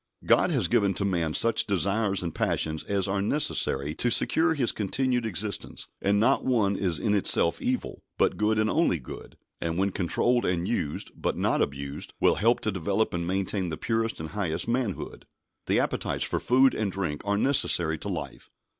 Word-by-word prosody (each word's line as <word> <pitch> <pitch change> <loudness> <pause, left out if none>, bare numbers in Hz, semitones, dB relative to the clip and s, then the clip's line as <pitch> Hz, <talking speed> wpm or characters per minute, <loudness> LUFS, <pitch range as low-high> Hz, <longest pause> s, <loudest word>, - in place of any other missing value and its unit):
God - - +4
has - - +2
given 100 -1 +2
to 100 - -1
man 85 -5 0
such 115 -1 +2
desires 100 +1 0
and 85 -2 -4
passions 80 0 -1
as 100 -2 0
are 100 0 -1
necessary 100 - +1
to 120 - 0
secure 160 +7 +3
his 125 -6 +1
continued 125 +3 -1
existence, 100 +1 -4
and 100 +1 +2
not 130 +6 +3
one 110 -6 +1
is 90 -5 -1
in 105 +8 0
itself 95 -4 +2
evil, - - -3 0.2
but - - +2
good 105 +1 +1
and 110 0 +2
only 135 - +2
good; 65 - -11 0.2
and 85 0 -2
when 95 +1 +1
controlled 120 +7 +1
and 90 0 -1
used, 75 -10 -3
but - - -2
not - - +1
abused, 70 +1 -4
will - - +4
help 115 +3 +3
to 110 - -1
develop 95 +4 -1
and 85 -1 -2
maintain 95 0 -1
the 80 - -4
purest 115 0 -1
and 80 0 -5
highest 90 -5 -2
manhood. 115 -4 -3 0.4
The - - +3
appetites - - -1
for - - -1
food 130 +2 +4
and 105 -3 -2
drink 90 -6 -3
are 100 0 0
necessary 85 - +2
to - - -6
life. - - -6
100 Hz, 185 wpm, -27 LUFS, 85-115 Hz, 0.4 s, God